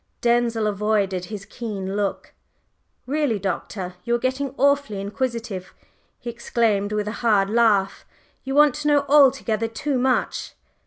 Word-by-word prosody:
Denzil 235 -2 +2
avoided 200 -3 0
his 200 0 -7
keen 200 -5 -5
look. 205 -1 -3 0.7
"Really, 280 -4 0
Doctor, 190 -1 -4
you 235 0 +1
are - - +2
getting 260 +2 -2
awfully 280 -7 +2
inquisitive!" 220 -2 -4 0.4
he - - -13
exclaimed 230 -3 0
with 210 0 -1
a - - -2
hard 205 -4 +3
laugh. 215 -4 +2 0.4
"You 270 +1 -3
want 295 -2 +6
to 300 +2 -4
know 290 -1 +3
altogether 265 -6 +4
too 260 +4 -2
much!" 255 0 0
230 Hz, 140 wpm, -23 LUFS, 205-260 Hz, 0.7 s, want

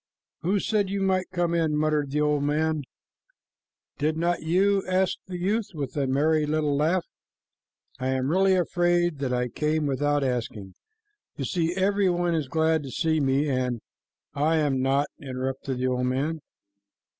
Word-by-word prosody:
"Who 195 +4 +1
said 205 -1 0
you 200 +1 -2
might 190 -1 +1
come 175 -2 0
in?" 160 -3 +1
muttered 150 -2 +1
the 150 +2 0
old 150 -1 +2
man. 155 +1 0 1.2
"Did 155 +2 0
not 175 +1 0
you?" 195 +5 +2
asked 185 0 +1
the 180 -1 -5
youth, 205 +5 0
with 140 -4 -4
a 140 -2 0
merry 150 +3 +2
little 150 -1 +1
laugh. 165 +5 +1 0.9
"I 130 - -2
am 130 +1 0
really 190 +2 +4
afraid 175 -2 +1
that 135 -2 -1
I 125 0 0
came 155 +4 -1
without 145 +1 +1
asking. 115 -7 -3 0.6
You - - -3
see, 170 -1 -1
every 195 0 +2
one 175 -1 +1
is 155 -4 -1
glad 160 +2 +1
to 140 - -7
see 160 +3 0
me 140 +1 +1
and" 130 -3 -1 0.5
"I 150 +3 +2
am 140 -4 +1
not," 135 +2 +2
interrupted 130 -1 -4
the 125 - -1
old 125 0 0
man. 145 +6 -1
155 Hz, 165 wpm, -26 LUFS, 135-175 Hz, 1.2 s, really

